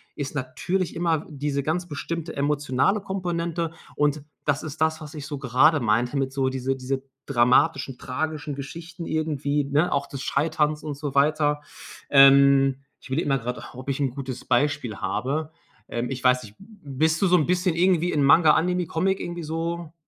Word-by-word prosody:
ist 145 Hz, 0 st, -5 dB
natürlich 145 Hz, +8 st, -2 dB
immer 165 Hz, -2 st, +1 dB
w -, -, -16 dB
diese 140 Hz, -1 st, -2 dB
ganz 175 Hz, +4 st, -1 dB
bestimmte 165 Hz, +2 st, -5 dB
emotionale 145 Hz, +6 st, +1 dB
Komponente. 170 Hz, -4 st, -2 dB, 0.2 s
Und 150 Hz, 0 st, +1 dB, 0.2 s
das 145 Hz, -1 st, 0 dB
ist 155 Hz, 0 st, -7 dB
das, 160 Hz, 0 st, +2 dB
was 155 Hz, +1 st, -9 dB
ich 150 Hz, -2 st, -7 dB
so 145 Hz, -, -4 dB
gerade 140 Hz, +4 st, +3 dB
meinte 120 Hz, +3 st, +1 dB
mit 135 Hz, -1 st, -1 dB
so 135 Hz, -1 st, +1 dB
diese 130 Hz, 0 st, -2 dB
diese 130 Hz, +1 st, -3 dB, 0.2 s
dramatischen, 125 Hz, +1 st, +2 dB
tragischen 150 Hz, +2 st, -3 dB
Geschichten 165 Hz, +5 st, -8 dB
irgendwie, 150 Hz, -2 st, -1 dB
ne, 145 Hz, +5 st, +1 dB
auch 140 Hz, 0 st, 0 dB
des 140 Hz, -, -7 dB
Scheiterns 150 Hz, +1 st, 0 dB
und 150 Hz, -2 st, -4 dB
so 145 Hz, -2 st, -4 dB
weiter. 150 Hz, +1 st, +2 dB, 0.5 s
Ähm, 135 Hz, -1 st, +6 dB, 0.2 s
ich -, -, -14 dB
überlege 150 Hz, +4 st, -1 dB
mal 135 Hz, -, +3 dB
gerade 125 Hz, +1 st, -4 dB
auch, -, -, -12 dB
ob 130 Hz, +2 st, -7 dB
ich 135 Hz, -, -1 dB
'n 140 Hz, -2 st, +1 dB
gutes 130 Hz, -1 st, -6 dB
Beispiel 125 Hz, -4 st, 0 dB
habe. 135 Hz, +11 st, -2 dB, 0.4 s
Ähm, 120 Hz, +1 st, -3 dB
ich 130 Hz, -2 st, -5 dB
weiß 125 Hz, 0 st, +4 dB
nicht, 105 Hz, -1 st, -13 dB
b 195 Hz, -, -15 dB, 0.3 s
bist 160 Hz, +2 st, +2 dB
du 195 Hz, -, +4 dB
so 180 Hz, -, +4 dB
'n 155 Hz, -, +2 dB
bisschen 180 Hz, -1 st, +1 dB
irgendwie 175 Hz, 0 st, +2 dB
in 145 Hz, -, +1 dB
Manga, 155 Hz, +3 st, +6 dB
Anime, 180 Hz, 0 st, +1 dB
Comic 190 Hz, +4 st, 0 dB
irgendwie 175 Hz, -1 st, -5 dB
so 165 Hz, +1 st, -4 dB
145 Hz, 185 wpm, -24 LUFS, 135-160 Hz, 0.5 s, Ähm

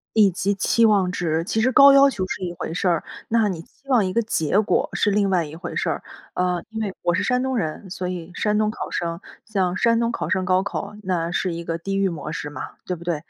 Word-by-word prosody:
以 210 Hz, -3 st, +6 dB
及 190 Hz, +3 st, 0 dB
期 230 Hz, +4 st, +3 dB
望 195 Hz, -4 st, +3 dB
值， 165 Hz, -2 st, -1 dB
其 220 Hz, +4 st, -1 dB
实 255 Hz, +4 st, +3 dB
高 280 Hz, +3 st, +8 dB
要 275 Hz, 0 st, +7 dB
求 200 Hz, -7 st, -3 dB
是 190 Hz, -, -4 dB
一 175 Hz, -1 st, -3 dB
回 160 Hz, -, -5 dB
事 180 Hz, -, -1 dB
儿。 170 Hz, -3 st, +2 dB, 0.3 s
那 225 Hz, -1 st, +3 dB
你 175 Hz, -4 st, -4 dB
希 275 Hz, +10 st, -22 dB
望 240 Hz, -6 st, +4 dB
一 185 Hz, -, -2 dB
个 235 Hz, -, +2 dB
结 195 Hz, -3 st, +1 dB
果 220 Hz, -, +1 dB
是 210 Hz, -, +2 dB
另 200 Hz, -1 st, +2 dB
外 180 Hz, -3 st, +2 dB
一 150 Hz, +1 st, -8 dB
回 170 Hz, -, -7 dB
事 -, -, 0 dB
儿。 -, -, -3 dB, 0.3 s
呃， 180 Hz, -1 st, 0 dB
因 220 Hz, 0 st, -5 dB
为， 195 Hz, -3 st, -3 dB
我 175 Hz, -1 st, +1 dB
是 205 Hz, -, 0 dB
山 250 Hz, -1 st, +1 dB
东 260 Hz, -1 st, -1 dB
人 185 Hz, +1 st, -3 dB
所 180 Hz, 0 st, -4 dB
以 180 Hz, -1 st, -5 dB
山 210 Hz, 0 st, +1 dB
东 215 Hz, -, +2 dB
考 215 Hz, -, -6 dB
生。 170 Hz, -1 st, -2 dB, 0.3 s
像 190 Hz, -4 st, 0 dB
山 230 Hz, +3 st, +3 dB
东 235 Hz, 0 st, +1 dB
考 -, -, -3 dB
生 185 Hz, -1 st, +1 dB
高 185 Hz, 0 st, +3 dB
考 200 Hz, +1 st, -4 dB
那 175 Hz, -2 st, -1 dB
是 180 Hz, 0 st, -1 dB
一 170 Hz, 0 st, -5 dB
个 165 Hz, 0 st, -3 dB
地 195 Hz, +3 st, -2 dB
狱 195 Hz, -1 st, +2 dB
模 155 Hz, -3 st, -6 dB
式 145 Hz, -, -4 dB
嘛， -, -, -7 dB
对 180 Hz, -, -2 dB
不 170 Hz, -, -11 dB
对？ 170 Hz, -1 st, 0 dB
190 Hz, 285 characters per minute, -23 LUFS, 175-215 Hz, 0.3 s, 高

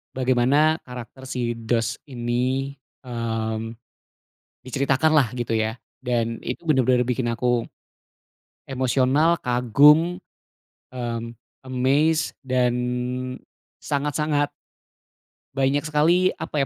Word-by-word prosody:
Bagaimana 130 Hz, +5 st, +3 dB
karakter 125 Hz, +1 st, -10 dB
si 125 Hz, -3 st, -3 dB
Dos 115 Hz, -1 st, -1 dB
ini, 130 Hz, +2 st, -2 dB, 0.3 s
eee, 115 Hz, -2 st, -2 dB, 1.0 s
diceritakan 135 Hz, +4 st, +1 dB
lah 145 Hz, -5 st, +5 dB
gitu 120 Hz, -2 st, -1 dB
ya. 110 Hz, 0 st, 0 dB, 0.3 s
Dan 115 Hz, -2 st, 0 dB
itu 125 Hz, -, -4 dB
bener-bener 130 Hz, -3 st, +3 dB
bikin 125 Hz, 0 st, -1 dB
aku 120 Hz, 0 st, 0 dB, 1.0 s
emosional, 135 Hz, +5 st, +2 dB
kagum, 145 Hz, +8 st, +4 dB, 0.7 s
mmm, 115 Hz, -2 st, -4 dB, 0.3 s
amazed, 135 Hz, +5 st, +1 dB
dan 125 Hz, -2 st, +1 dB, 1.1 s
sangat-sangat 145 Hz, 0 st, -1 dB, 1.0 s
banyak 135 Hz, +1 st, +1 dB
sekali 165 Hz, +5 st, +3 dB
apa 150 Hz, -, -4 dB
130 Hz, 85 wpm, -23 LUFS, 120-145 Hz, 1.1 s, lah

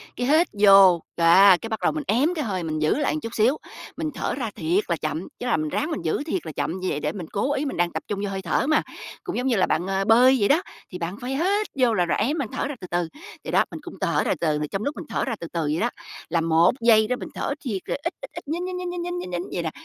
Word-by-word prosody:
cái 245 Hz, +1 st, -2 dB
hít 320 Hz, +4 st, +4 dB
vô. 195 Hz, -4 st, +7 dB, 0.2 s
Đ -, -, 0 dB
á, 185 Hz, +2 st, +7 dB
cái 225 Hz, -, -6 dB
bắt 220 Hz, -, -3 dB
đầu -, -, +3 dB
mình 305 Hz, -1 st, -4 dB
ém 270 Hz, -, +2 dB
cái 305 Hz, -, -1 dB
hơi 185 Hz, -4 st, -2 dB
mình 155 Hz, -1 st, -2 dB
giữ 155 Hz, -, +2 dB
lại 295 Hz, 0 st, 0 dB
một 310 Hz, -, -2 dB
chút 230 Hz, +1 st, -6 dB
xíu, 240 Hz, +7 st, +3 dB, 0.4 s
mình 315 Hz, -, -2 dB
thở -, -, -2 dB
ra 245 Hz, -5 st, -3 dB
thiệt 175 Hz, +6 st, +1 dB
là 170 Hz, -, +1 dB
chậm, 155 Hz, +3 st, -3 dB
chứ 245 Hz, -, -5 dB
là 245 Hz, -, +2 dB
mình 155 Hz, -1 st, -2 dB
ráng 305 Hz, -, -2 dB
mình 310 Hz, -, -3 dB
giữ -, -, -1 dB
thiệt 325 Hz, +3 st, -3 dB
là -, -, -5 dB
chậm 170 Hz, +5 st, -3 dB
như 185 Hz, -, -3 dB
vậy 145 Hz, -, -2 dB
để 150 Hz, -, -1 dB
mình 170 Hz, -2 st, -7 dB
cố 265 Hz, +8 st, 0 dB
ý, 290 Hz, -, -1 dB
mình 275 Hz, -, -4 dB
đang 175 Hz, 0 st, +1 dB
tập -, -, -4 dB
trung 205 Hz, -, -3 dB
vô 205 Hz, -, -2 dB
hơi 195 Hz, -1 st, -4 dB
thở 185 Hz, -, 0 dB
mà. 310 Hz, -, +3 dB, 0.4 s
Cũng 370 Hz, -, -4 dB
giống 250 Hz, +2 st, -1 dB
như 250 Hz, -, +2 dB
là 190 Hz, -, +3 dB
bạn, 175 Hz, +3 st, -1 dB
à, 195 Hz, 0 st, 0 dB
bơi 245 Hz, +5 st, +6 dB
vậy 200 Hz, -, +3 dB
đó, 310 Hz, +5 st, +4 dB, 0.3 s
thì 180 Hz, -, -5 dB
bạn 175 Hz, +4 st, -4 dB
phải 255 Hz, +2 st, -3 dB
hít 400 Hz, +7 st, +1 dB
vô 245 Hz, -3 st, +4 dB
là 180 Hz, -5 st, +2 dB
rồi 170 Hz, -, 0 dB
ém, 275 Hz, +10 st, 0 dB
bạn 275 Hz, -6 st, -2 dB
thở -, -, -2 dB
ra 290 Hz, -, -5 dB
từ 180 Hz, -, -7 dB
từ 175 Hz, -1 st, 0 dB, 0.4 s
vậy -, -, -5 dB
đó, -, -, +4 dB
mình -, -, -7 dB
cũng -, -, -10 dB
thở -, -, +1 dB
ra -, -, +1 dB
từ 170 Hz, -, 0 dB
từ. 150 Hz, -1 st, +1 dB
Trong 195 Hz, +2 st, -2 dB
lúc 290 Hz, +4 st, -2 dB
mình -, -, -7 dB
thở -, -, -1 dB
ra 235 Hz, -4 st, -2 dB
từ 170 Hz, -, -6 dB
từ 170 Hz, -, -1 dB
vậy 150 Hz, +1 st, -1 dB
đó, 235 Hz, -, +1 dB, 0.4 s
là 165 Hz, -, +1 dB
1 165 Hz, +1 st, +4 dB
giây 220 Hz, -2 st, +5 dB
đó 250 Hz, -, 0 dB
mình -, -, -7 dB
thở -, -, -2 dB
thiệt 210 Hz, -9 st, -3 dB
là -, -, -2 dB
ít, 340 Hz, -, -2 dB
ít, -, -, -8 dB
ít, -, -, -9 dB
nhín, 340 Hz, +4 st, -2 dB
nhín, 365 Hz, 0 st, -4 dB
nhín, 360 Hz, -1 st, -4 dB
nhín, 350 Hz, 0 st, -4 dB
nhín, 355 Hz, +1 st, -3 dB
nhín, 185 Hz, -, -6 dB
nhín 175 Hz, -1 st, -2 dB
vậy 175 Hz, -, -2 dB
nè, 160 Hz, -, -1 dB
215 Hz, 320 wpm, -24 LUFS, 175-285 Hz, 0.4 s, vô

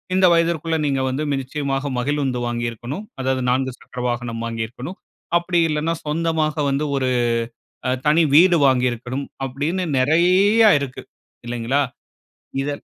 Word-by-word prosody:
இந்த 190 Hz, 0 st, +5 dB
வயதிற்குள்ள 165 Hz, -1 st, +1 dB
நீங்க 135 Hz, -2 st, 0 dB
வந்து 140 Hz, +4 st, -2 dB
நிச்சயமாக 135 Hz, +1 st, -2 dB
மகிழுந்து 135 Hz, -2 st, -1 dB
வாங்கியிருக்கணும். 120 Hz, -, -4 dB, 0.2 s
அதாவது, 130 Hz, 0 st, 0 dB
4 130 Hz, 0 st, 0 dB
சக்கர 125 Hz, -, -8 dB
வாகனம் 120 Hz, -1 st, -3 dB
வாங்கியிருக்கணும். 115 Hz, +9 st, -5 dB, 0.4 s
அப்டி 175 Hz, 0 st, 0 dB
இல்லனா 155 Hz, +2 st, 0 dB
சொந்தமாக 155 Hz, -1 st, 0 dB
வந்து 140 Hz, +2 st, 0 dB
ஒரு 130 Hz, -1 st, 0 dB, 0.8 s
அ -, -, +2 dB, 0.2 s
தனி 155 Hz, +3 st, +5 dB
வீடு 175 Hz, +2 st, +7 dB
வாங்கியிருக்கணும். 125 Hz, +1 st, 0 dB, 0.2 s
அப்டீன்னு 145 Hz, +8 st, -2 dB
நிறைய 180 Hz, -, +4 dB
இருக்கு. 140 Hz, -3 st, -6 dB, 0.4 s
இல்லைங்களா? 120 Hz, +3 st, -1 dB, 0.8 s
இத 140 Hz, -, -2 dB
140 Hz, 120 wpm, -21 LUFS, 125-165 Hz, 0.8 s, வீடு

